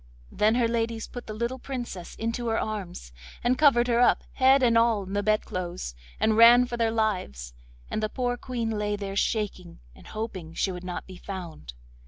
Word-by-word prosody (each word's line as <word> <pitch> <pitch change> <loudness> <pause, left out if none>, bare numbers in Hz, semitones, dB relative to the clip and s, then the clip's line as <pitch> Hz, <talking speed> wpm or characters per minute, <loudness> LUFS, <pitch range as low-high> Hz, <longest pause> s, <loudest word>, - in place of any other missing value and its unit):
Then 215 +2 +2
her 240 -1 +3
ladies 230 -1 -2
put 245 - -9
the 215 - -5
little 235 +4 -3
Princess 240 -10 -6
into 230 +1 -3
her 225 0 +1
arms, 180 - -5 0.3
and 245 +2 +3
covered 250 -4 +4
her 235 -1 +2
up, 245 - +4
head 265 0 +4
and 235 -2 +4
all, 230 -3 +3
in 190 +1 -8
the 205 - +1
bedclothes, 185 - -2 0.3
and 220 - +3
ran 235 +2 +8
for 240 -1 -5
their 230 -1 +1
lives, 185 - -2 0.3
and - - -3
the 215 - -1
poor 245 0 -1
Queen 240 -2 -3
lay 210 -1 -1
there 200 -1 -5
shaking, 200 -4 -2
and - - -16
hoping 190 -7 -6
she 195 - 0
would 180 0 -7
not 180 -1 -5
be 185 -1 -11
found. 175 - -8
220 Hz, 195 wpm, -27 LUFS, 190-235 Hz, 0.3 s, ran